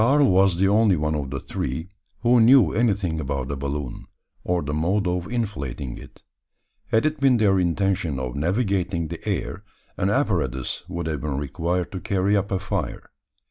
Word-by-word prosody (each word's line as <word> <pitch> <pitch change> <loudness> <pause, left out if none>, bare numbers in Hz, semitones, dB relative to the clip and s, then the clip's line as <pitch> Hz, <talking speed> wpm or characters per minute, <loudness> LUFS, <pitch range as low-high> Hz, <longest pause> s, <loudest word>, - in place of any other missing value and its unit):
Karl 140 +5 +5
was 95 -1 +4
the 95 +2 +3
only 105 -1 +4
one 75 -1 -1
of 70 -3 -3
the 70 0 -4
three 65 +6 -4 0.3
who 120 0 +4
knew 115 - +6
anything 100 -8 +1
about 70 -2 -3
a - - -2
balloon, 70 -1 -5 0.4
or 90 -2 0
the 75 +1 -3
mode 90 +6 +1
of 90 +2 -2
inflating 70 - -3
it. - - -14 0.6
Had 110 +6 +2
it 155 -1 0
been 135 -3 +4
their 100 -4 +3
intention 90 -3 0
of 65 -1 -4
navigating 90 - 0
the 85 - -7
air, 95 - -3 0.3
an 95 - +1
apparatus 85 - 0
would 85 -2 -4
have 75 -4 -2
been 70 -3 -2
required 85 +5 -2
to 95 - -4
carry 100 +3 +1
up 100 0 0
a 95 - 0
fire. 95 - -4
90 Hz, 180 wpm, -24 LUFS, 75-105 Hz, 0.6 s, knew